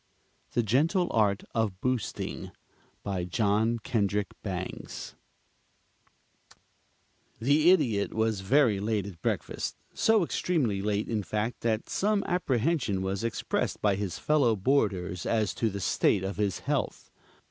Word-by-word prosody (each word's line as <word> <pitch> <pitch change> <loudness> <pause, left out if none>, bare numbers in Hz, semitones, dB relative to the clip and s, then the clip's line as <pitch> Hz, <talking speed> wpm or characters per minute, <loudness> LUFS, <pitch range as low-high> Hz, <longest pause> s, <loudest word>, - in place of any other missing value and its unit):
THE 120 - +2
GENTLE 160 - +2
ART 105 -3 +2
OF 105 -5 -1
BOOSTING 125 -1 -2 0.5
BY 95 -3 -2
JOHN 110 +4 +1
KENDRICK 105 -4 0
BANGS 95 -2 -5 2.3
The 145 +7 +4
Idiot 125 - +3
was 110 -2 0
very 115 0 +3
late 105 -1 -1
at 95 -5 -9
breakfast, - - -2 0.2
so 220 -3 +3
extremely 135 - 0
late 105 +1 -1
in 110 -2 -1
fact 110 +4 -3
that 110 -1 0
some 205 0 +1
apprehension 135 - 0
was 95 +2 -2
expressed 115 -1 -1
by 105 -2 +2
his 95 -2 -3
fellow 140 -7 +3
boarders 100 -6 0
as 110 -3 +1
to 115 - 0
the 100 -1 -5
state 95 +2 +2
of 95 +1 -3
his 100 -2 -1
health. - - -2
110 Hz, 125 wpm, -28 LUFS, 100-130 Hz, 2.3 s, The